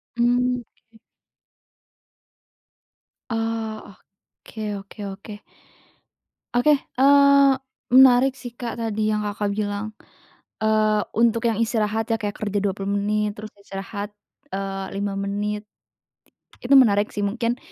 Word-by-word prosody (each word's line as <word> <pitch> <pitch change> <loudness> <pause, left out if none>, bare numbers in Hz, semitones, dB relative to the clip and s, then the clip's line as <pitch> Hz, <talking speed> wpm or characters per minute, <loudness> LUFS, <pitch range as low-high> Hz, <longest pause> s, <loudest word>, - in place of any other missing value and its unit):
Mmm, 245 +1 +1 0.3
oke. - - -18 2.3
Oh 225 -3 -3 0.5
oke 215 -2 -5
oke 200 +2 -11
oke. 200 +2 -8 1.2
Oke, 245 +5 +4
eee, 280 +1 +5 0.4
menarik 260 +1 +7
sih, 245 -2 -9
Kak, 235 -1 -5
tadi 215 -1 -1
yang 210 - 0
Kakak 205 0 -2
bilang, 205 +1 -3 0.7
eee, 215 -1 +3 0.2
untuk 230 0 +3
yang 220 - -1
istirahat 220 -1 0
ya 225 - -2
kayak 205 -1 -3
kerja 205 -1 -2
20 195 0 -2
menit 210 +1 0
terus 215 0 -9
istirahat, 200 +1 -7 0.4
eee, 195 0 -3
5 200 0 -3
menit, 205 +1 -3 1.0
itu 255 +3 +3
menarik 210 -5 +4
sih 205 -1 -2
mungkin, 230 +4 -1
215 Hz, 110 wpm, -23 LUFS, 205-235 Hz, 2.3 s, menarik